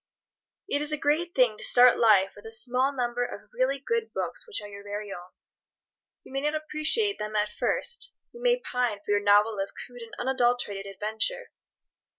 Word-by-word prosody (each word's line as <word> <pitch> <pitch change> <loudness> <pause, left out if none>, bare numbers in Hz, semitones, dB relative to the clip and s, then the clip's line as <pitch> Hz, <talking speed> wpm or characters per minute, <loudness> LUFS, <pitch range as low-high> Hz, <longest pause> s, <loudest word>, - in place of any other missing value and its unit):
It 285 - 0
is 300 0 +3
a 300 - +1
great 310 +5 0
thing 240 -5 +3
to - - -6
start 245 0 +6
life 205 -4 +5
with 205 +2 -11
a - - -8
small 250 +4 +1
number 245 -2 -1
of 245 - -8
really 265 +2 +1
good 455 - -2
books - - -4
which 445 - -2
are 205 - -8
your 200 0 -10
very 205 0 -5
own. 175 +1 -10 0.9
You - - -14
may 270 - -1
not 300 +2 0
appreciate 310 +7 0
them 210 0 -4
at 210 0 +1
first. 475 - -2 0.2
You 475 - -12
may - - +3
pine 245 - -1
for - - -2
your 205 0 +3
novel 205 +1 +4
of 195 - -4
crude 245 -1 -10
and 230 -1 -10
unadulterated 245 -6 0
adventure. 220 - -3
245 Hz, 190 wpm, -27 LUFS, 210-295 Hz, 0.9 s, start